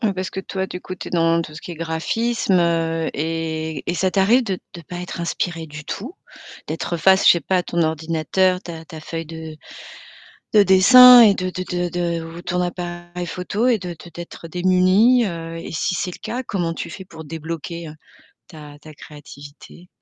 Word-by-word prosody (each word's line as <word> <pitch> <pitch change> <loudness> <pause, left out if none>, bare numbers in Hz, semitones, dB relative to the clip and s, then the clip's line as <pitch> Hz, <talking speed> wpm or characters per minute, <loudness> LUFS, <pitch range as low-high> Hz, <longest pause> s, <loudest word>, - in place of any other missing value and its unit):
Heu 220 -4 +1
parce 185 0 -4
que 190 - -4
toi 190 0 -4
du 180 - -7
coup, 185 - -7
tu - - -8
es - - -13
dans 165 -1 +2
tout 155 -2 -10
ce 160 - -9
qui 175 - -8
est - - -7
graphisme, 180 +8 -1
heu 165 -1 0
et 160 0 -3
et - - -2
ça 185 +1 +1
t'arrive 210 +7 +3
de 195 -6 -3 0.2
de 170 - -9
pas 175 +3 -9
être 175 -1 -6
inspiré 170 -1 -3
du 150 0 -10
tout? 255 - -6 0.5
D'être 165 +2 -3
face, 190 +4 +4
je - - +10
sais 170 - -1
pas, 185 +5 0
à - - 0
ton 170 -1 -1
ordinateur, 165 +4 0
ta 165 -2 -8
ta 160 0 -10
feuille 165 +1 -6
de 160 -1 -8 1.0
de 210 -2 +7
dessin 245 +6 +9
et 210 -4 +6
de 185 0 -2
de 185 0 -5
de 180 -1 -2
de 170 -1 -2
ou 165 +1 -9
ton 180 0 -2
appareil 175 0 -5
photo 200 +7 -2
et 245 -3 +4
de 180 -3 -7
de 175 0 -10
d'être 170 0 -9
démuni. 185 +8 +3
Heu 165 -2 -6
et 165 - -7
si 165 +3 -1
c'est 180 - -2
le - - -11
cas, 235 +4 -4
comment 175 -8 -2
tu 170 - -6
fais 190 +3 -9
pour 160 -3 -11
débloquer 165 +1 -6 0.6
ta 150 -3 -12
ta 155 0 -13
créativité? 145 +3 -13
175 Hz, 205 wpm, -21 LUFS, 165-185 Hz, 1.0 s, je